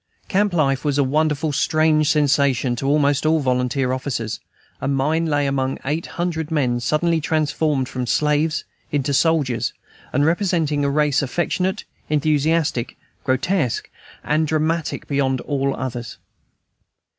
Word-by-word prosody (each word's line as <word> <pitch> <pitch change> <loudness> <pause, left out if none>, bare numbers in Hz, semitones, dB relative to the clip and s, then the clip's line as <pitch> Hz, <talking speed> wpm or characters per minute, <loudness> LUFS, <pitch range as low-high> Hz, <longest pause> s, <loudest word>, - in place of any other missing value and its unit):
Camp 205 +1 +2
life 140 -6 +1
was 145 -2 0
a 140 - +4
wonderfully 150 +2 +1
strange 155 +1 +2
sensation 140 -4 +2
to 135 +3 -3
almost 145 -1 +2
all 160 +1 +3
volunteer 125 -1 0
officers, 125 -4 -3 0.4
and 140 - 0
mine 155 +5 +1
lay 145 -2 +1
among 135 -1 -1
eight 155 +4 -2
hundred 165 -3 -2
men 130 -6 +1
suddenly 160 +6 +1
transformed 150 -3 0
from 125 -2 -4
slaves 150 +3 +1 0.3
into 145 -1 0
soldiers, 145 -5 +1 0.4
and 145 +3 +2
representing 165 -4 +1
a 140 - +2
race 145 0 +2
affectionate, 180 +7 -1 0.3
enthusiastic, 150 -3 +1 0.3
grotesque, 135 - 0 0.3
and 155 +1 +1
dramatic 160 +1 -1
beyond 135 -2 0
all 140 -1 -1
others. 120 -2 -5
145 Hz, 130 wpm, -21 LUFS, 135-160 Hz, 0.4 s, a